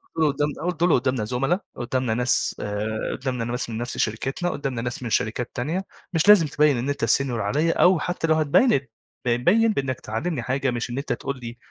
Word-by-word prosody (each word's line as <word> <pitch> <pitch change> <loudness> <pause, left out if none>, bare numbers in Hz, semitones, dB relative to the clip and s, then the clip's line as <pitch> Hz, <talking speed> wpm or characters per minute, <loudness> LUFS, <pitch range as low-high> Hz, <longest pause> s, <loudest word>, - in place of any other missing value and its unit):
قُلت - - -17
له 160 -1 +3
قُدّام 145 +1 0
آه. 165 - -5
قُلت 165 -1 -12
له: 175 - +5
"قُدّامنا 130 -4 -1
زُملا، 135 - 0 0.2
قُدّامنا 125 -1 -1
ناس 120 +1 +1
آآ 105 +1 -3
قُدّامنا 125 -3 -2
ناس 120 0 -2
من 110 - -4
نفس 120 +1 -4
شركتنا، 135 +10 -1
قُدّامنا 135 -6 -3
ناس 120 +1 -4
من 120 - -3
شركات 115 +3 -1
تانية، 160 +10 -2 0.3
مش 165 +4 +1
لازم 205 -7 +8
تبيّن 145 -2 +3
إن 125 +4 -2
أنت 140 0 0
senior - - +4 0.2
عليّا 145 +11 +1
أو 180 -2 +5
حتّى 175 -1 -2
لو 160 - +4
هتبيّن 155 - +4
ات 130 -4 -1 0.3
ب 120 - +1
بيّن 205 - +3
بإنّك 130 - -2
تعلّمني 120 +6 -3
حاجة 130 +1 0
مش 120 0 -3
إن 120 - -4
أنت 140 -2 -2
تقول 140 +3 -5
لي 120 +1 -7
130 Hz, 220 wpm, -24 LUFS, 120-155 Hz, 0.3 s, لازم